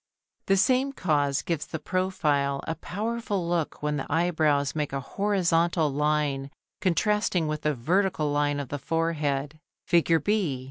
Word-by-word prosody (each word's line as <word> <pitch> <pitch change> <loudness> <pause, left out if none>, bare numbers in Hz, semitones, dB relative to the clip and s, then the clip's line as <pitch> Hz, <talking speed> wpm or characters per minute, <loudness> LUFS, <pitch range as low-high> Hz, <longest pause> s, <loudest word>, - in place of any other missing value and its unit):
The 195 - +4
same 260 +6 +2
cause 145 - +1
gives 165 -3 -2
the - - -4
profile 150 -6 0
a 160 - 0
powerful 205 0 -3
look 170 -4 -2
when 150 0 0
the 140 - -5
eyebrows 155 -4 +2
make 150 -3 -2
a 135 - -1
horizontal 170 -2 +1
line 145 -1 0 0.3
contrasting 210 -1 +1
with 155 0 -3
the 150 0 0
vertical 155 +3 +1
line 145 0 +1
of 140 -3 -5
the 145 - -4
forehead 155 -2 -1 0.3
(Fig. 165 -2 +3
B). 195 -11 0
160 Hz, 145 wpm, -27 LUFS, 145-185 Hz, 0.3 s, The